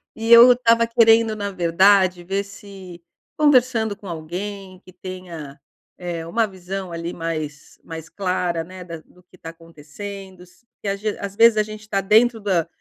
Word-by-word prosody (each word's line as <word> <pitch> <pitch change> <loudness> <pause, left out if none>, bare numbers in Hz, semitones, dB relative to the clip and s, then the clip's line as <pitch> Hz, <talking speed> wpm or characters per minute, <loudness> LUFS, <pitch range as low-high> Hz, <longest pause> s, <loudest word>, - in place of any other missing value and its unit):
e 225 +1 -3
eu 240 +2 +9
estava 230 -1 +2
querendo 225 -1 +4
na 200 -1 -4
verdade 185 +1 +3
ver 195 +3 -2
se 195 -4 -12 0.4
conversando 250 -7 +2
com 200 0 -13
alguém 185 +3 -7
que 185 - -16
tenha, 175 -6 -9 0.4
eh, 170 -2 -5
uma 225 +6 0
visão 190 -1 -7
ali 170 +1 -5
mais 155 -3 -6
mais 160 -1 -9
clara, 180 -3 -2
né, 185 +2 -11
da 170 -1 -8
do 180 - -23
que 180 - -22
está 165 -2 -10
acontecendo, 180 +4 -11
se 180 +6 -26 0.2
a 195 - 0
ge 210 +1 -4
às 200 0 -6
vezes 230 0 +5
a 215 - +3
gente 215 0 -10
está 210 -2 -2
dentro 225 +4 +3
da 185 -6 0
190 Hz, 170 wpm, -21 LUFS, 170-215 Hz, 0.4 s, eu